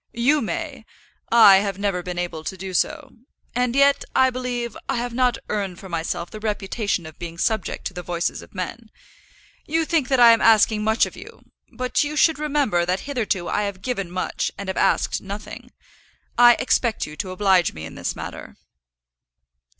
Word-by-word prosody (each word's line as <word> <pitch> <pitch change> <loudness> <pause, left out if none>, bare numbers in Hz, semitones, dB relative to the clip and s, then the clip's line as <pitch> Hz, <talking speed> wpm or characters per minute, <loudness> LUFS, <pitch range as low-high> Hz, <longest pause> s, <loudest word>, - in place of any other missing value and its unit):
"You 280 +5 +3
may. 290 -1 -4 0.5
I 220 -4 +8
have 195 -1 -1
never 200 -3 -1
been 180 0 -6
able 175 -3 -4
to 190 - -5
do 190 0 -7
so. 265 - -2 0.4
And 250 0 0
yet, 280 0 +4
I 260 0 +4
believe, 245 -2 -4
I 270 - +1
have 240 0 -3
not 250 -1 +2
earned 195 -4 -3
for 190 - -10
myself 170 +1 -3
the 215 - -8
reputation 205 -3 -2
of 160 -1 -12
being 170 -1 -7
subject 220 +5 -1
to - - -4
the 180 - -6
voices 175 -1 -3
of - - -16
men. 215 +5 -6 0.8
You 320 +2 +1
think 310 -5 +1
that 265 -1 +2
I 235 -1 +9
am 230 - +3
asking 220 -1 +4
much 220 +1 +3
of - - -9
you; - - -13 0.3
but 255 +3 0
you 295 +1 -4
should 315 0 +3
remember 285 -12 +1
that 180 +2 -1
hitherto 220 -10 -2
I 210 - 0
have 200 -2 -4
given 200 -8 -3
much 185 +1 -2
and 200 -1 -6
have 190 - -2
asked - - +1
nothing. 200 +2 -8 0.7
I 240 0 +8
expect 240 -2 0
you 150 - -10
to 190 -1 -4
oblige 185 -1 +2
me 80 0 -8
in 80 - -9
this - - -4
matter." - - -8
215 Hz, 190 wpm, -22 LUFS, 185-250 Hz, 0.8 s, I